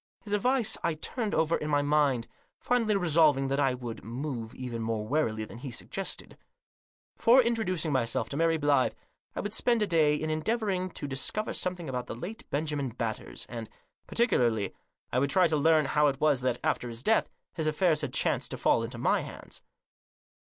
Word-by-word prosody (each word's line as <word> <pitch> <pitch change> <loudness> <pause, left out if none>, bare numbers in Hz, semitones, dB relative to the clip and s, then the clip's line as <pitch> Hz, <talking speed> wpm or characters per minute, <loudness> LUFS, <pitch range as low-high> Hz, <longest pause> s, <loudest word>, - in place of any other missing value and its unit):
His 205 -2 -5
advice 245 +3 +1
I 170 -2 0
turned 215 +7 -3
over 160 +1 +2
in 150 - -3
my 145 -1 +2
mind, 145 -5 +2 0.3
finally 240 -4 +1
resolving 155 -7 +3
that 140 +1 0
I 135 -3 +2
would 120 -2 -7
move 120 0 -5
even 125 -3 -5
more 110 -1 -2
warily 110 -7 0
than 115 - -11
he 135 +1 -6
suggested. 190 +10 -6 0.8
Before 240 +3 +6
in 235 -2 +3
troducing 185 -8 -1
myself 120 -4 0
to - - -4
Mary 165 0 +3
Blyth, 145 -4 +2 0.4
I - - -2
would 205 0 -4
spend 235 -2 +2
a - - +2
day 160 -5 +3
in 155 +1 -2
endeavouring 185 +2 -1
to - - -5
discover 140 +11 -2
something 180 -2 -3
about 125 -2 -3
the - - -5
late 190 - -8
Benjamin 145 -2 -1
Batters, 115 -2 -5
and, 115 -2 -7 0.4
particularly, 120 - +2 0.4
I 125 - +3
would 140 +1 +1
try 180 +4 +5
to 160 - 0
learn 155 0 +4
how 150 +2 +3
it 140 -1 -1
was 150 -4 +3
that, 125 -1 0
after 125 - 0
his 115 +1 -6
death, 220 +6 +3 0.2
his 160 -3 -2
affairs 155 0 +2
had - - -3
chanced - - 0
to - - -5
fall - - +3
into 115 +1 -5
my - - +2
hands. - - -9
150 Hz, 190 wpm, -29 LUFS, 125-180 Hz, 0.8 s, Before